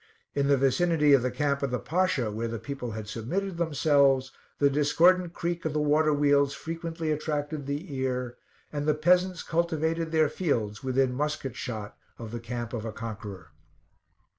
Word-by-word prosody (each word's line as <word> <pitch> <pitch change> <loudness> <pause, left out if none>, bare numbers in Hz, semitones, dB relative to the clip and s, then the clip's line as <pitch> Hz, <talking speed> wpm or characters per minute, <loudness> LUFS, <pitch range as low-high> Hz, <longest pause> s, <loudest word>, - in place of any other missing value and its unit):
In 140 -1 +1
the 140 -1 +4
vicinity 150 +2 +3
of 135 - +6
the 130 - 0
camp 140 +3 0
of 140 - 0
the 125 - -1
Pasha, 160 -11 0
where 115 +2 -3
the 115 0 -4
people 125 0 -5
had 110 -1 -6
submitted 170 - -3
themselves, 140 -5 +3 0.3
the 145 - +4
discordant 165 +5 +3
creak 170 +1 -3
of 160 - -2
the 150 - +1
water 150 +1 +3
wheels 145 -1 +3
frequently 165 -1 -4
attracted 150 -1 -2
the 145 +3 -4
ear, 125 -2 -2 0.4
and 145 0 -2
the 150 - +3
peasants 180 +3 +2
cultivated 165 -1 0
their 160 -1 +4
fields 115 - -2
within 130 0 +1
musket 145 -2 -2
shot 110 -4 -5 0.2
of 115 -2 -8
the 120 - -4
camp 120 0 -5
of 115 -3 -3
a 115 - -4
conqueror. 105 -7 -7
145 Hz, 170 wpm, -28 LUFS, 125-160 Hz, 0.4 s, of